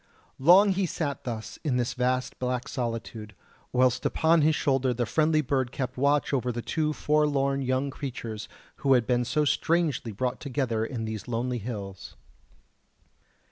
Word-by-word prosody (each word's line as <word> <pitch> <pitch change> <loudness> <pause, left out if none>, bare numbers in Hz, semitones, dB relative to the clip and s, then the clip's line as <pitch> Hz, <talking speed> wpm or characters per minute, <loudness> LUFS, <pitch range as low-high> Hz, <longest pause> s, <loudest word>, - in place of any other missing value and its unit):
Long 180 +9 +7
he 190 -1 +1
sat 145 -3 -3
thus 115 -3 -5
in 140 -6 +1
this 120 -1 -1
vast 130 0 -1
black 125 -1 -2
solitude, 115 -4 -5 0.4
whilst 125 0 +2
upon 160 0 +3
his 155 +1 +3
shoulder 135 -3 +1
the 120 0 0
friendly 155 +5 +2
bird 130 -3 -1
kept 130 -2 -4
watch 140 +2 +1
over 125 -2 +1
the 120 0 -5
two 155 -1 0
forlorn 145 -3 +1
young 130 +1 0
creatures 115 -6 -6 0.3
who 135 - +3
had 120 -3 +3
been 125 0 +1
so 150 +5 +1
strangely 155 -6 +1
brought 125 +5 -2
together 125 -5 -1
in 115 -1 -4
these 110 -1 -5
lonely 120 +1 -2
hills. 100 -4 -7
130 Hz, 155 wpm, -27 LUFS, 120-145 Hz, 0.4 s, Long